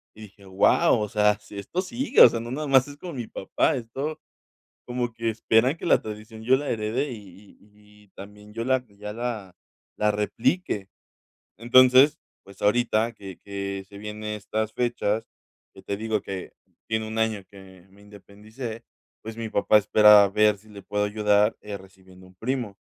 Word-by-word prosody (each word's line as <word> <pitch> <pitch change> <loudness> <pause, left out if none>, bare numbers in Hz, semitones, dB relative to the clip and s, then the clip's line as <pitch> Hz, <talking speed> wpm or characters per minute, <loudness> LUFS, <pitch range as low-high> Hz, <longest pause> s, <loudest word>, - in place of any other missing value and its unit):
Y 110 - -14
dije: 100 -1 -15
"Wao, 95 +3 +3
o 105 -1 -2
sea, 105 -1 +2
si 100 - -13
esto 170 - -3
sigue". 240 +9 +1
O - - +11
sea, 115 - -3
no 115 +1 -7
nada 150 +3 -3
más 135 -1 +4
es 145 0 -11
con 170 0 -8
mi 120 -3 -5
papá. 95 - 0
Esto 135 +6 -5 0.7
como 120 -1 -3
que 115 0 -2
esperan 115 +5 +2
que - - -10
la - - +4
tradición 110 +1 -9
yo 125 +4 +4
la 145 +1 -5
herede, 115 +6 -2
y 100 -2 -13
y 105 0 -22
y - - -27
también 105 +1 -12
yo 115 +2 -4
la 130 0 +1
ya 105 +1 -9
la 110 -5 -5 0.4
la 105 0 +2
replique. 105 - -1 0.7
Entonces, 130 +6 +6 0.2
pues, 100 0 -16
ahorita 115 +1 +2
que 95 -4 -10
que 100 -1 -5
se 100 - -13
vienen 105 +1 -7
estas 110 +1 -3
fechas 120 -3 -1 0.5
que - - -14
te 100 - -3
digo 110 0 -2
que 95 -2 -7 0.4
tiene 110 0 -1
1 110 +1 -6
año 110 -3 0
que 95 -3 -15
me 100 +1 -20
independicé. 105 +3 -10 0.4
Pues, 110 0 -8
mi 115 -1 -4
papá 105 +1 +4
espera 105 0 +7
a 100 - +1
ver 105 +1 +3
si 110 +2 -21
le 100 -2 -12
puedo 105 0 -1
ayudar, 105 0 +2
eh, 105 -1 -6
recibiendo 95 -1 -17
un 95 - -21
primo. 115 -1 -3
105 Hz, 185 wpm, -25 LUFS, 100-120 Hz, 0.7 s, O